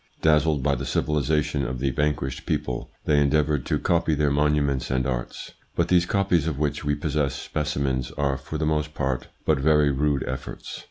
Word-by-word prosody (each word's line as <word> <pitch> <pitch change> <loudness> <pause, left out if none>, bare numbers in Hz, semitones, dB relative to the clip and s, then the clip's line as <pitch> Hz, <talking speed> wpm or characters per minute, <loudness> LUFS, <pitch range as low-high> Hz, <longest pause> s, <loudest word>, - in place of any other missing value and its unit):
Dazzled 75 -2 +3
by 70 0 +2
the 60 - -3
civilisation 75 -1 0
of 65 0 -3
the 65 +2 0
vanquished 65 -1 -2
people, 60 -1 -2 0.2
they 75 -1 +3
endeavoured 75 -1 +1
to - - +1
copy 80 -2 +1
their 75 -1 +1
monuments 70 -2 +1
and 65 -1 0
arts; 60 -2 -4 0.2
but - - +1
these 90 -1 +4
copies, 95 -6 +2
of 75 -4 -2
which 75 0 -1
we 75 0 +1
possess 75 -4 -1
specimens, 70 -4 -2
are 70 -1 0
for 65 +3 -6
the 80 - -1
most 75 0 -1
part 65 -2 -2 0.2
but - - +3
very 75 0 +4
rude 70 0 +1
efforts. 65 -2 -6
75 Hz, 180 wpm, -25 LUFS, 65-75 Hz, 0.2 s, these